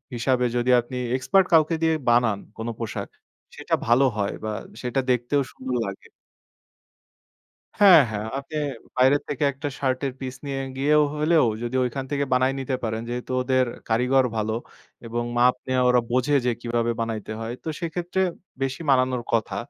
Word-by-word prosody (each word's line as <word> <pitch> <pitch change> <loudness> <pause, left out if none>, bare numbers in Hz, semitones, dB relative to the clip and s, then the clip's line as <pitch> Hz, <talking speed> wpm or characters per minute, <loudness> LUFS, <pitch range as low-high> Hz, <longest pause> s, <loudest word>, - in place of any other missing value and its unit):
হিসাবে 125 +1 +1
যদি 120 +1 0
আপনি 125 +2 -5 0.2
এক্সপার্ট 190 +8 +3
কাউকে 160 +1 +5
দিয়ে 160 0 +3 0.2
বানান 120 -4 +3 0.2
কোন 115 +1 -5
পোশাক 115 -2 -4 0.5
সেটা - - -1
ভালো 125 +4 +5
হয় 100 -1 -1
বা 110 - -2 0.3
সেটা 125 +2 -1
দেখতেও 125 +4 +1
সুন্দর 130 -1 -4
লাগে। 100 - -8 1.7
হ্যাঁ, 190 -5 +9
হ্যাঁ, 105 0 -3
আপনি 145 +3 -10 0.4
বাইরে 130 +3 +5
থেকে 145 0 -2
১ - - -18
টা 145 - 0
শার্টের 130 0 0
পিস 130 -1 -5
নিয়ে 135 -1 -3 0.2
গিয়েও 150 +2 +3
হলেও 155 -2 +3 0.2
যদি 120 +2 -3
ওইখান 130 +2 -2
থেকে 140 0 0
বানায় 130 +1 +3
নিতে 130 0 -2
পারেন, 110 0 -2
যেহেতু 125 +1 -4
ওদের 130 0 +2 0.2
কারিগর 125 +3 +3
ভালো 110 +1 -1 0.5
এবং 120 +1 -2
মাপ 125 +1 +5
নিয়ে 130 0 +1
ওরা 125 0 +5
বোঝে 130 +4 +2
যে, 125 - +3
কিভাবে 120 0 0
বানাইতে 110 -1 -4
হয়। 115 +1 -4
তো - - -9
সেক্ষেত্রে 175 +2 -2 0.4
বেশি 135 +3 -2
বানানোর 130 -2 +2
কথা। 115 -2 0
130 Hz, 160 wpm, -24 LUFS, 120-140 Hz, 1.7 s, হ্যাঁ